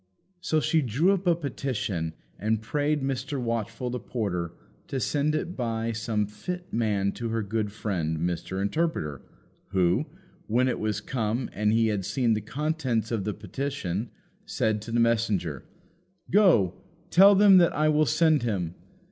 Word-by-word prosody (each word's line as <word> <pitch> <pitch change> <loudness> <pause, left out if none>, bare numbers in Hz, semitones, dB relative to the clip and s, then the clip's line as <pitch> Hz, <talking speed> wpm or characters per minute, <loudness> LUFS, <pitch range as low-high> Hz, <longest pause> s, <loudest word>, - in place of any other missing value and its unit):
So 165 -3 +1
she 160 +1 +2
drew 140 - +2
up 195 -1 -1
a 170 - +5
petition 120 - -3 0.3
and 110 +1 +1
prayed 145 +6 -1
Mr. 135 +1 -2
Watchful 115 +1 -2
the 125 - -3
porter 90 -10 -3 0.4
to 135 - -2
send 145 +4 0
it 175 +3 -3
by 115 -2 -2
some 110 -1 -1
fit 180 - -7
man 105 -4 +1
to 115 +2 -4
her 115 -1 -1
good 105 0 -2
friend, 90 -7 -2
Mr. 90 +3 -2
Interpreter; 100 - -1 0.5
who, 95 - +1 0.4
when 125 +4 +2
it 125 - -1
was 105 -1 -1
come 115 +1 -2
and 105 0 +1
he 115 0 +3
had 100 -3 -1
seen 120 +3 +1
the 110 - -1
contents 130 -2 -1
of 110 -5 -1
the 105 - -1
petition, 120 -7 -3 0.3
said 110 -1 -1
to 115 - -8
the 120 - +1
messenger, 110 - +1 0.7
"Go, 170 - +5 0.4
tell 200 +3 +8
them 195 -1 +7
that 170 - +4
I 155 +1 +2
will 155 0 +3
send 155 +1 +3
him." 95 -8 -2
115 Hz, 160 wpm, -27 LUFS, 105-145 Hz, 0.7 s, tell